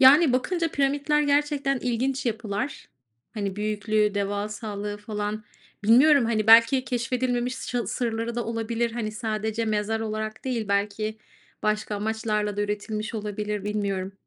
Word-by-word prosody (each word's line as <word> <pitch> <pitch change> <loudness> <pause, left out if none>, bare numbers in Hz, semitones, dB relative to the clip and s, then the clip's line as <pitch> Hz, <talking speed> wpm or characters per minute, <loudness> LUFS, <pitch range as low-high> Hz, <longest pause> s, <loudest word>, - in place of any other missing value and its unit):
yani, 275 +2 +8
bakınca 330 +6 +1
piramitler 285 +2 +1
gerçekten 285 -2 +1
ilginç 255 +2 -1
yapılar, 220 +3 -3 0.5
hani, 200 -2 -3
büyüklüğü, 210 0 +1
devasallığı 205 +1 -3
falan, 210 0 -4 0.4
bilmiyorum, 265 +4 +6
hani, 220 -2 0
belki 230 +3 +7
keşfedilmemiş 245 +1 -1
ş 245 -1 -3
sırları 230 +1 -2
da 240 - -2
olabilir, 230 0 -1
hani, 220 -2 -3
sadece 220 0 -2
mezar 215 0 0
olarak 215 +2 -4
değil, 235 -5 -2
belki 210 +2 -1 0.4
başka 215 -1 0
amaçlarla 210 -1 -1
da - - 0
üretilmiş 210 +1 -3
olabilir, 210 -1 -3
bilmiyorum. 200 -2 -2
220 Hz, 125 wpm, -26 LUFS, 210-245 Hz, 0.5 s, yani